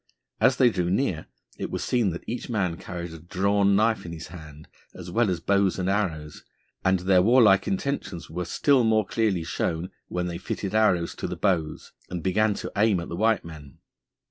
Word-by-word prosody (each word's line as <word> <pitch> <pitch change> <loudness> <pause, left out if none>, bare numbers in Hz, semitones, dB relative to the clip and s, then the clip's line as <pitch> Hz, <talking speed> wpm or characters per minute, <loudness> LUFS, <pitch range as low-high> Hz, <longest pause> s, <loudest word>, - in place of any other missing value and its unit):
As 125 +4 +4
they 125 -3 +5
drew 90 -4 -1
near 95 -5 -1 0.3
it - - -3
was - - -3
seen 120 -5 +1
that 85 - -6
each 120 +2 -5
man 95 -7 0
carried 85 -2 -7
a 80 - -9
drawn 100 +3 +1
knife 110 +2 +2
in 85 - -7
his 80 - -8
hand, 75 -3 -12 0.3
as 90 -1 -8
well 115 +2 +2
as 90 -2 -1
bows 100 0 +1
and 90 -1 -2
arrows, 85 -7 -2 0.4
and 95 -1 +2
their 90 0 +4
warlike 105 -2 +5
intentions 140 - -3
were 90 +2 -4
still 135 - +3
more 110 -2 +3
clearly 100 -5 0
shown 80 +2 -2 0.2
when 90 0 -2
they 85 -1 -4
fitted 95 +1 -4
arrows 95 -6 +2
to - - -5
the - - -5
bows 85 -6 -1 0.2
and 90 -3 -5
began 105 +3 +2
to - - -6
aim 105 -2 +3
at 85 - -6
the 85 - -4
white 110 0 +1
men. 75 -5 -11
95 Hz, 195 wpm, -25 LUFS, 85-110 Hz, 0.4 s, they